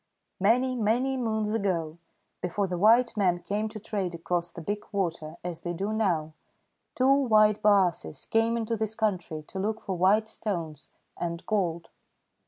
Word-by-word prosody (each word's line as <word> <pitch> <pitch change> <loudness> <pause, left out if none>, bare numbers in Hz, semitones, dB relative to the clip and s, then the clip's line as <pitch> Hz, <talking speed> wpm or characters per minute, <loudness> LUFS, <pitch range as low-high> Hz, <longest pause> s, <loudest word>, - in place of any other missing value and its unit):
"Many, 250 +6 +3
many 245 +4 +1
moons 220 -4 -1
ago, 170 -7 -1 0.4
before 180 +3 -1
the 180 -2 -3
white 230 +4 +5
men 185 -4 +2
came 205 +5 -2
to 215 0 -8
trade 195 -4 -3
across 170 +1 -2
the 170 - -9
Big 205 +5 -3
Water 165 -5 -2
as 175 -2 -5
they 175 - -3
do 200 +5 -2
now, 170 -8 0 0.6
two 260 +2 +4
white 215 -6 +4
baases 185 - +2
came 225 +1 +2
into 230 0 -1
this 220 0 -2
country 180 -8 -2
to 190 - -7
look 215 +3 -1
for 190 - -3
white 200 +5 +3
stones 170 -9 -4 0.3
and 170 0 -4
gold. 175 -6 -1
200 Hz, 160 wpm, -28 LUFS, 175-220 Hz, 0.6 s, white